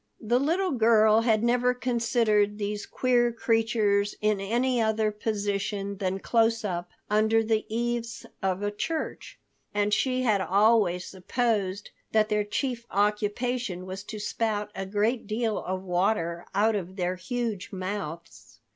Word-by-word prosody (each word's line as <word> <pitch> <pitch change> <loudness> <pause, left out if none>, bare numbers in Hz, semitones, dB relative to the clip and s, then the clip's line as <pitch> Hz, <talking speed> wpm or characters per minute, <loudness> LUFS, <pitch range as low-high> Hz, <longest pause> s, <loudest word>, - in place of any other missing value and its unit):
The 240 +3 +1
little 345 +7 +1
girl 220 -3 +5
had 225 -2 +2
never 245 +1 +2
considered 230 -4 +1
these 205 0 -3
queer 245 -2 +2
creatures 225 -3 +1
in 210 -1 +1
any 240 +4 +1
other 220 -1 +1
position 205 -1 -2
than 190 -1 -1
close 225 +2 +1
up 175 -2 -3 0.2
under 220 +2 +3
the 220 -1 0
eaves 235 0 -2 0.2
of 190 0 -1
a 205 - 0
church. 315 +10 -4 0.4
And 205 0 +1
she 255 +1 +1
had 215 -5 +2
always 195 -2 +3
supposed 200 0 -2 0.2
that 215 0 +3
their 210 0 +1
chief 235 +2 -3
occupation 210 0 -1
was 185 +1 -6
to 215 0 -7
spout 210 0 -2
a 195 -1 -5
great 215 +5 0
deal 220 0 -1
of 185 0 -4
water 175 -2 0
out 215 +2 +3
of 185 -2 -4
their 180 -1 -1
huge 220 +1 -3
mouths. 185 -4 -6
215 Hz, 140 wpm, -27 LUFS, 200-230 Hz, 0.4 s, girl